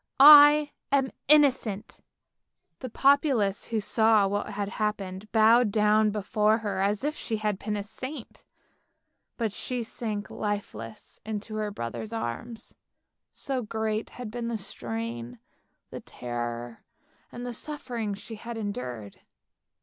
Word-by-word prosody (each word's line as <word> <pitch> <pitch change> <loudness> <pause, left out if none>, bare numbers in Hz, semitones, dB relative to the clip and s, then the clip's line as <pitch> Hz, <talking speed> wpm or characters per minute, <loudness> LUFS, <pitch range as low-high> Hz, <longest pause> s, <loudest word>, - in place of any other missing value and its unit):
I 295 +1 +9 0.2
am 270 -1 +2 0.2
innocent." 265 -9 +3 0.8
The 255 - -6
populace 270 -6 +2
who 225 -1 -1
saw 220 -1 +3
what 205 +2 -2
had 205 -1 -3
happened 205 -1 -3
bowed 225 +1 +5
down 215 0 +3
before 210 +1 +1
her 205 -4 -3
as 200 +4 0
if 300 +1 -1
she 225 -6 -3
had 210 -2 -2
been 210 -1 -3
a 200 - -3
saint, 255 +5 -9 0.9
but 225 -3 -1
she 245 +4 -4
sank 215 -2 -5
lifeless 115 - -5
in 215 -1 -3
her 215 -1 -3
brother's 205 - -6
arms; 225 - -5 0.6
so 265 -2 -3
great 220 -1 -2
had 245 -4 -6
been 235 0 -4
the 235 -1 -2
strain, 120 - -6 0.5
the - - -7
terror 120 -1 -5 0.5
and 245 0 -7
the 245 - -4
suffering 235 -6 -4
she 225 - -10
had 235 +2 -7
endured. 125 - -5
215 Hz, 130 wpm, -27 LUFS, 200-235 Hz, 0.9 s, I